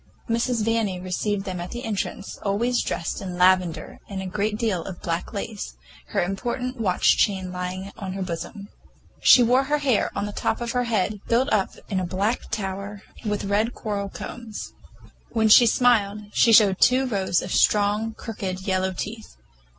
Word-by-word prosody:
Mrs. 230 -1 0
Vanni 225 -5 0
received 195 +2 -2
them 185 -3 -4
at 175 - -6
the 240 +1 -6
entrance, 205 -2 -4
always 235 +5 +1
dressed 170 - -3
in 180 -2 -5
lavender 180 -2 +2
with 195 -1 -4
a 190 - -4
great 210 +3 -1
deal 215 -7 -1
of 185 -2 -8
black 170 0 -2
lace, 205 - -5 0.3
her - - 0
important 245 +7 -3
watch 185 -4 +3
chain 190 -3 +1
lying 180 +2 -5
on 190 -2 -5
her 195 0 -3
bosom. 185 +4 -6 0.5
She 250 - +8
wore 250 +3 +3
her 295 +2 +1
hair 275 -6 +1
on - - -1
the 205 - -4
top 215 - -1
of 240 -1 -3
her 245 0 0
head, 210 -2 0
built 250 +3 +2
up 200 -3 +1
in 195 -3 -1
a - - -2
black 195 +6 -1
tower, 200 0 -4 0.2
with 210 -2 -2
red 210 +4 +1
coral 200 -3 -3
combs. 225 +1 -8 0.6
When 220 -2 +3
she 235 +3 +8
smiled, 215 -4 +3
she 230 - +5
showed 205 -4 +6
two 255 +1 +5
rows 195 -7 0
of - - -6
strong, 210 +2 +2
crooked 190 -4 -5
yellow 190 -1 0
teeth. 215 +4 -6
205 Hz, 175 wpm, -24 LUFS, 190-230 Hz, 0.6 s, She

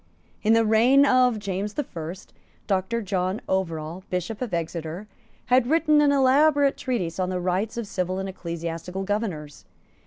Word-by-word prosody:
In 220 - +3
the 225 0 +4
reign 240 +6 +5
of 255 -3 +4
James 200 0 -4
the 295 - -1
First, 170 - -8 0.3
Doctor 195 +4 -1
John 185 +1 -1
Overall, 170 -2 -2
Bishop 180 +5 -3
of 245 -4 -3
Exeter, 170 +2 -4 0.4
had 250 -1 +3
written 305 0 +4
an 290 -1 +4
elaborate 280 +1 +4
treatise 195 - -3
on 185 -1 0
the 185 -1 -2
rights 185 +6 -1
of 235 - -3
civil 185 -2 -2
and 190 0 -3
ecclesiastical 170 0 -5
governors. 190 -8 -4
195 Hz, 155 wpm, -25 LUFS, 180-245 Hz, 0.4 s, reign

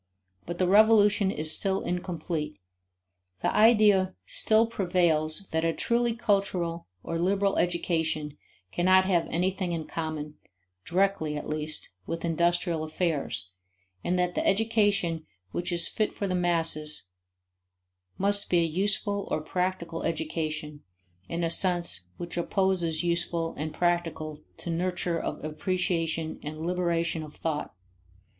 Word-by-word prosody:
But 175 0 -4
the 185 - +2
revolution 210 0 +5
is 155 -3 +1
still 195 -1 +1
incomplete. 170 -4 -3 0.9
The - - +1
idea 210 -4 +5
still 220 +1 +3
prevails 175 -5 +1
that 160 0 0
a 165 0 +2
truly 235 +3 +1
cultural 195 -7 0 0.2
or 165 0 -3
liberal 195 +2 +2
education 160 -4 0 0.4
cannot 185 +2 +4
have 180 -3 +2
anything 185 +1 -1
in 160 -2 -3
common, 155 -2 -5 0.5
directly 180 -5 +1
at 150 - -6
least, 155 0 -2 0.2
with 165 +1 -3
industrial 170 0 +1
affairs, 155 - -2 0.5
and 180 - 0
that 180 0 +1
the - - -1
education 200 -6 +2 0.2
which 175 - -2
is 170 -1 +2
fit 215 - -1
for 200 - -3
the 185 - -1
masses 165 -4 +1 1.1
must 200 +1 +1
be 175 - +3
a 170 - +4
useful 200 +4 -1
or - - 0
practical 170 0 -2
education 155 -2 -3 0.5
in 170 +1 -2
a 165 - +1
sense 170 - +3
which 175 0 -5
opposes 175 -3 +1
useful 170 -1 -1
and 155 +1 -4
practical 165 -3 -1 0.2
to 170 - -5
nurture 175 0 -1
of - - -4
appreciation 165 -1 -1
and 155 +2 -6
liberation 170 -2 0
of 150 -1 -9
thought. 155 -8 -3
175 Hz, 130 wpm, -28 LUFS, 160-190 Hz, 1.1 s, revolution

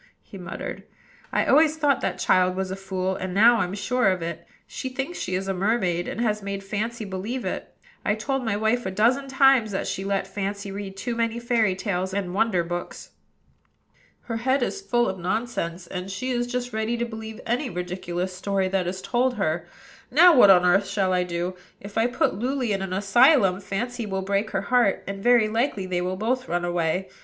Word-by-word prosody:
he - - -14
muttered. 180 -2 -6 0.5
"I - - +1
always 310 +2 +4
thought 290 -3 +2
that - - -2
child 185 0 +3
was 190 0 -3
a - - -2
fool, 190 -1 -2
and 185 0 -4
now 230 +4 +6
I'm 185 -3 -1
sure 250 +3 +1
of 185 -2 -1
it. 170 0 -6 0.2
She 260 - -5
thinks 270 +7 -4
she 180 - -2
is 190 +1 -2
a 195 - 0
mermaid, 185 -3 0
and - - -5
has 215 -3 0
made 200 0 -5
Fancy 215 +3 -3
believe 205 +7 -4
it. - - -4 0.3
I've 210 - +1
told 270 +4 -2
my 220 -3 0
wife 220 +3 +1
a - - -1
dozen 235 +8 +2
times 270 -4 +4
that 190 - -2
she 190 - -3
let 195 -1 -1
Fancy 200 +1 -4
read 195 -1 -6
too 235 +4 -3
many 230 0 -1
fairy 230 -5 +1
tales 190 -1 -2
and 190 -3 -2
wonder 195 -3 +2
books. 175 +1 -6 1.1
Her 230 -2 -4
head 260 +3 +1
is 400 - -3
full 240 -10 +1
of 190 0 -3
nonsense, 180 -3 -2
and 180 +2 -6
she 255 +7 -3
is 240 -1 0
just 245 -1 -3
ready 220 +2 -1
to 235 - -1
believe 220 -1 -8
any 245 +4 -1
ridiculous 180 0 -4
story 195 0 0
that 185 -2 0
is 185 +1 -4
told 250 +1 +1
her. 170 -4 -1 0.4
Now, 335 +5 +7
what 245 -6 +8
on 180 -2 +7
earth 195 +3 +3
shall 195 -2 0
I 180 0 +2
do? 175 +1 -3 0.3
If 200 +1 -11
I 225 +1 +3
put 245 - +1
Luly 255 -1 -1
in 195 - -2
an 195 -1 -4
asylum, 195 +1 +4
Fancy 235 +4 -3
will 190 -1 -2
break 200 +2 0
her 195 - -1
heart, 235 -3 +2
and 195 0 -5
very 240 -1 +5
likely 225 -2 -1
they 180 -1 -1
will 185 +1 -2
both 250 +5 -1
run 175 0 0
away. 175 +2 -1
200 Hz, 205 wpm, -25 LUFS, 185-240 Hz, 1.1 s, what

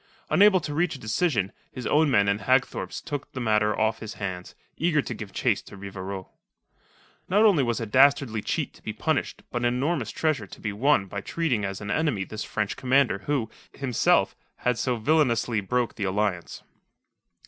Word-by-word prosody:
Unable 205 -2 +6
to 150 - -4
reach 160 +1 0
a - - -9
decision, 110 - 0 0.2
his 125 -3 -7
own 155 +4 +3
men 100 -6 +3
and 100 +1 +1
Hagthorpe's 130 +1 0
took 145 -1 -5
the 130 - -5
matter 105 -2 +2
off 110 0 +1
his 110 -1 -7
hands, 95 -3 -5 0.2
eager 165 -2 +1
to 130 - -2
give 105 -3 -8
chase 115 -6 +1
to 100 - -13
Rivarol. 95 -1 -7 1.0
Not 205 +4 +4
only 195 -9 +5
was 120 -3 0
a 115 - -3
dastardly 130 -1 +4
cheat - - -2
to - - -19
be - - -5
punished - - -2
but 120 - -1
an - - 0
enormous 125 +1 0
treasure 145 -9 -1
to - - -12
be 105 -2 -3
won 120 -1 +3
by 100 +1 -5
treating 140 -9 -1
as 100 0 -4
an 100 0 -4
enemy 145 -10 0
this 110 +2 -6
French 105 -2 -2
commander 130 -6 +2
who, 135 -7 0 0.2
himself, 130 -4 +2 0.2
had 125 -2 -1
so 125 -2 0
villainously 120 -4 +2
broken 120 +4 -1
the 100 - -2
alliance. 95 -2 -2
120 Hz, 185 wpm, -26 LUFS, 105-140 Hz, 1.0 s, Unable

